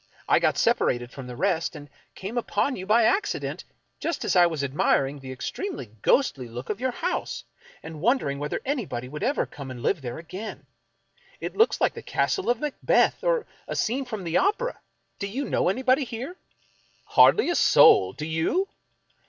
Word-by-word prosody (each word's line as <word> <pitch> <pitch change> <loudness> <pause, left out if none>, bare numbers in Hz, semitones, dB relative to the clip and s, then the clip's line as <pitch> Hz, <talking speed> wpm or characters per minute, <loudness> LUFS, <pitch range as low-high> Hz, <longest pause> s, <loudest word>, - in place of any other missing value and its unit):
I - - +5
got - - +1
separated 120 0 +1
from 130 -1 -9
the 125 - -7
rest, 170 +1 0
and 145 -1 -9 0.3
came 195 +5 -6
upon 255 +3 0
you 185 0 -7
by 225 +2 +5
accident, 395 - 0 0.3
just 335 - -2
as - - +1
I 175 -1 +7
was 160 -4 -3
admiring 140 0 +1
the 130 -1 -8
extremely 130 - -5
ghostly 145 - +2
look 120 - -6
of 210 - -5
your 260 - +1
house, 245 - -3 0.4
and 160 -2 -8
wondering 190 - +1
whether 150 +1 -2
anybody 205 - -3
would 150 +3 -7
ever 275 +4 +1
come 140 -2 -9
and 125 -1 -8
live 175 -1 +1
there 120 -2 -5
again. 185 +6 -8 0.7
It - - -5
looks 450 +2 +3
like - - +2
the - - -8
castle 385 - -1
of 240 -1 +2
Macbeth, 295 -1 +1
or - - +1 0.2
a - - -4
scene 260 +4 0
from 220 -6 -5
the 170 0 0
opera. 460 +6 0 0.4
Do 200 - -2
you 260 +8 -3
know - - +1
anybody 260 +6 +2
here? 250 +9 -6 0.3
" - - -37
" - - -37
Hardly 420 -4 +6
a - - 0
soul! 95 - +6
Do 150 - -6
you? 165 - 0
195 Hz, 185 wpm, -26 LUFS, -, 0.7 s, I